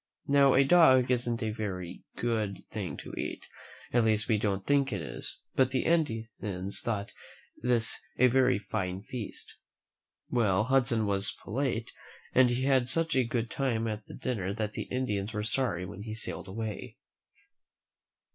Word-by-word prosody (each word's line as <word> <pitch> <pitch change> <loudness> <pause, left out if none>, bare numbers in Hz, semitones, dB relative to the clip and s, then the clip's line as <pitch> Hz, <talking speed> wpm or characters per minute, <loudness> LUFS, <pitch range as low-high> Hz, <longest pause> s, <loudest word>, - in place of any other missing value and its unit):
Now, 140 -1 +5
a 135 - +6
dog 135 -5 +6
isn't 120 -1 0
a 110 - 0
very 95 -5 -5
good 110 -4 -1
thing - - -4
to - - -9
eat, - - -4 0.5
at 120 -1 +4
least 110 -1 +2
we 110 -3 +2
don't 100 -2 -1
think 140 -2 +3
it 100 - -1
is; 80 - -6 0.2
but 130 -1 +3
the 130 -1 0
Indians 110 - -1
thought 105 -3 -2 0.5
this 120 -2 +1 0.2
a 125 - +6
very 130 -1 +4
fine 95 -1 -3
feast. 115 -2 -7 0.7
Well, 105 -5 +2
Hudson 125 -3 +2
was 100 0 0
polite, 115 0 -2 0.4
and 130 -1 +6
he 120 +2 0
had 130 -2 +3
such 165 +3 +1
a 130 - +4
good 115 -1 -2
time 115 -5 0
at 105 -1 -4
the - - -9
dinner 100 -6 -2
that 105 -1 -2
the - - -4
Indians 110 -5 -1
were 105 -1 -2
sorry 110 -6 0
when 95 - -8
he 110 0 -5
sailed 110 - -6
away. 105 +2 -5
115 Hz, 160 wpm, -30 LUFS, 105-130 Hz, 0.7 s, a